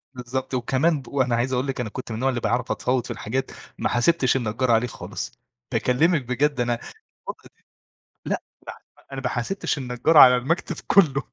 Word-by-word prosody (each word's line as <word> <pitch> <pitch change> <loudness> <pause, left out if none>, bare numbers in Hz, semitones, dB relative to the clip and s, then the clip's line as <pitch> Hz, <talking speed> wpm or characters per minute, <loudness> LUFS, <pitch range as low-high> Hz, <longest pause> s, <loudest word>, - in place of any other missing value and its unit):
بالضبط 125 +2 -5
وكمان 135 +5 +1
ب 125 - -17
وأنا 130 -4 0
عايز 125 +3 -1
أقول 130 +2 0
لكِ 135 -2 -3
أنا 115 - -4
كنت 120 +1 -7
من - - -3
النوع 130 +4 0
اللي 125 -2 -1
باعرف 120 +1 -1
أتفاوض 125 -1 0
في - - -6
الحاجات، 130 +5 -3 0.3
ما - - -1
حاسبتش 130 +1 +2
النجار 120 0 0
عليه 115 +2 +3
خالص. - - -6 0.4
باكلمك 155 +5 +2
بجد 130 +3 -1
أنا 120 0 +1 0.6
من - - -3
كتر - - -17 0.8
لأ، - - -2 0.6
لا، - - -27
أنا 135 - -4
ما 130 - -1
حاسبتش 135 +8 -2
النجار 125 +4 0
على 125 -3 +9
المكتب 155 +8 -2
كله. 150 -8 +4
130 Hz, 185 wpm, -23 LUFS, 120-135 Hz, 0.8 s, على